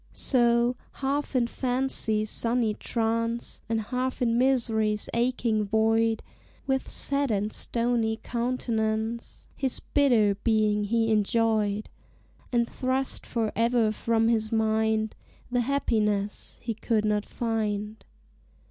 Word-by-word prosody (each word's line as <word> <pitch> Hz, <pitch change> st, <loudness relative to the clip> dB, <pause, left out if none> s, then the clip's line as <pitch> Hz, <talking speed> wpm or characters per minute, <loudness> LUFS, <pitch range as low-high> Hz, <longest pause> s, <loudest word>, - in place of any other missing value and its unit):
So, 240 Hz, -1 st, +2 dB, 0.2 s
half 280 Hz, +1 st, -2 dB
in 245 Hz, -2 st, +3 dB
fancy's 245 Hz, -4 st, 0 dB
sunny 230 Hz, -2 st, +1 dB
trance, 230 Hz, +1 st, -2 dB
And 225 Hz, -1 st, +1 dB
half 255 Hz, +4 st, -2 dB
in 235 Hz, -3 st, +1 dB
misery's 225 Hz, -4 st, +1 dB
aching 235 Hz, -2 st, +1 dB
void 225 Hz, +1 st, +2 dB, 0.4 s
With 265 Hz, -1 st, 0 dB
set 280 Hz, -1 st, -1 dB
and 210 Hz, 0 st, -1 dB
stony 230 Hz, -2 st, 0 dB
countenance 230 Hz, -2 st, -2 dB
His 265 Hz, -3 st, -1 dB
bitter 240 Hz, -8 st, +3 dB
being 215 Hz, -2 st, +2 dB
he 225 Hz, +1 st, +1 dB
enjoyed, 215 Hz, -1 st, +1 dB, 0.6 s
And 235 Hz, -1 st, +2 dB
thrust 260 Hz, +2 st, -2 dB
for 225 Hz, -2 st, -1 dB
ever 230 Hz, -1 st, +2 dB
from 225 Hz, +1 st, +1 dB
his 220 Hz, -2 st, +1 dB
mind 220 Hz, -1 st, +1 dB, 0.4 s
The 245 Hz, 0 st, +2 dB
happiness 215 Hz, -6 st, -1 dB
he 235 Hz, -, -2 dB
could 220 Hz, 0 st, 0 dB
not 210 Hz, -1 st, +1 dB
find. 215 Hz, -2 st, -3 dB
230 Hz, 110 wpm, -27 LUFS, 215-245 Hz, 0.6 s, in